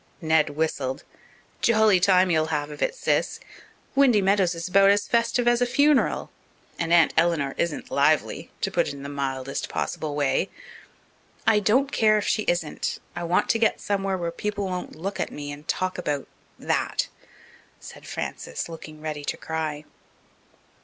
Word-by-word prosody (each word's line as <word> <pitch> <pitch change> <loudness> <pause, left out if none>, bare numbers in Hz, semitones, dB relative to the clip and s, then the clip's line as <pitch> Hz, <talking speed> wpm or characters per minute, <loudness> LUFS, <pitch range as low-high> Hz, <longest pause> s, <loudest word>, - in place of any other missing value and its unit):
Ned 160 -2 +2
whistled. 145 -3 -2 0.6
"Jolly 220 -4 +4
time 185 0 +4
you'll 155 -1 +2
have 150 -2 -2
of 150 - -9
it, - - 0
Sis. - - 0 0.5
Windy 270 -6 +5
Meadows 190 -2 +2
is 165 +1 -4
about 195 +1 +5
as 205 0 +3
festive 235 +1 +1
as 240 0 +3
a - - +4
funeral. 285 +2 +2 0.5
And 165 0 -1
Aunt 170 -2 +5
Eleanor 160 -5 +2
isn't 170 -3 -2
lively, 145 +2 +1
to - - 0
put - - +1
it - - -4
in 140 - -9
the 140 - -6
mildest 135 -1 -3
possible 150 -2 -3
way." 145 +5 +1 1.0
"I 220 -2 +5
don't 255 +7 +2
care 215 -1 +4
if 210 - -1
she - - +1
isn't. 175 -3 -1 0.2
I - - -4
want 175 +1 +1
to 225 - +2
get 225 - +2
somewhere 195 -1 -1
where 170 -1 -3
people 205 +2 -3
won't 180 -1 -4
look 195 +5 -5
at - - -1
me 145 0 -6
and 145 +2 -10
talk 185 0 -1
about 145 -5 -2 0.3
that," - - -1 0.7
said - - -12
Frances, - - -4
looking 155 -2 -10
ready 155 -2 -4
to - - -2
cry. 155 -2 -4
170 Hz, 165 wpm, -25 LUFS, 150-205 Hz, 1.0 s, Windy